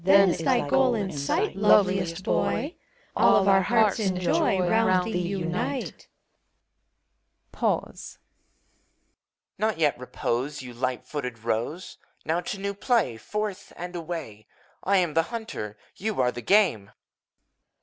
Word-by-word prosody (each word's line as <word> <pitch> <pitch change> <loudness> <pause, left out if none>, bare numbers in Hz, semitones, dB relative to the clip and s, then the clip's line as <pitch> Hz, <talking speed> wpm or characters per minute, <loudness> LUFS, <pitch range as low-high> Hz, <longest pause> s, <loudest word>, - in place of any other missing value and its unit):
Then 195 0 +6
is - - -3
thy 255 -3 +1
goal 265 -2 +3
in 200 -3 -2
sight, 140 +4 -1
Loveliest 190 -3 +3
Boy! 280 - 0 0.4
All - - +5
of 195 - +3
our 195 -1 +5
hearts 220 0 +2
in 190 -4 0
joy 180 +1 +2
Round 185 0 +2
thee 180 - 0
unite. 180 +7 -3 1.4
Pause. - - -2
EUPHOBIOK. - - -45
Not 220 0 0
yet 150 -6 +1
repose, 130 +2 -3
Ye 125 -1 -9
light 125 +1 -3
footed 125 -5 -5
roes! 115 +10 -3 0.3
Now 165 +3 0
to 195 +3 -5
new 200 +1 -2
play 205 - +1
Forth, 205 - -5
and 180 +1 -7
away! 160 -11 -6 0.4
I 195 +1 +3
am 175 -4 +1
the 165 - +4
hunter. 220 - -6 0.2
You 215 +1 -3
are 125 -1 +3
the 120 - -7
game. 150 - +3
180 Hz, 140 wpm, -26 LUFS, 140-205 Hz, 1.4 s, Then